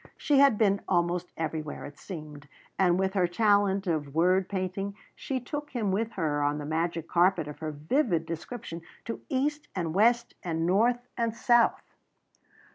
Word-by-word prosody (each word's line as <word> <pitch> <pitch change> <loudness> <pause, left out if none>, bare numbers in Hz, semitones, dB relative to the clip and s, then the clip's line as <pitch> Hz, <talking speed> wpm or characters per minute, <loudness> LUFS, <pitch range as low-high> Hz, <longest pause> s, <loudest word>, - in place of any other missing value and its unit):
She 285 -2 +3
had 275 -6 +6
been 200 -2 +3
almost 175 0 0
everywhere, 155 -2 -4
it 145 - -11
seemed, 150 -5 -9 0.3
and 180 -2 +4
with 190 0 0
her 185 -3 +2
talent 200 +1 +2
of 155 -5 -2
word 185 +3 +3
painting, 195 +1 -3 0.2
she 265 -2 -3
took 290 +4 -5
him 220 -6 -1
with 225 +4 -1
her 155 -6 -1
on 145 +1 +1
the 150 - -5
magic 165 +1 -2
carpet 175 -2 +3
of 150 - -8
her 155 - -3
vivid 165 - 0
description 165 +1 -6 0.2
to 230 - -5
east 290 +3 -1
and 170 -4 -2
west 235 +5 +3
and 165 -2 -1
north 240 +7 +2
and 230 -1 0
south. 240 0 +3
185 Hz, 165 wpm, -28 LUFS, 165-230 Hz, 0.3 s, had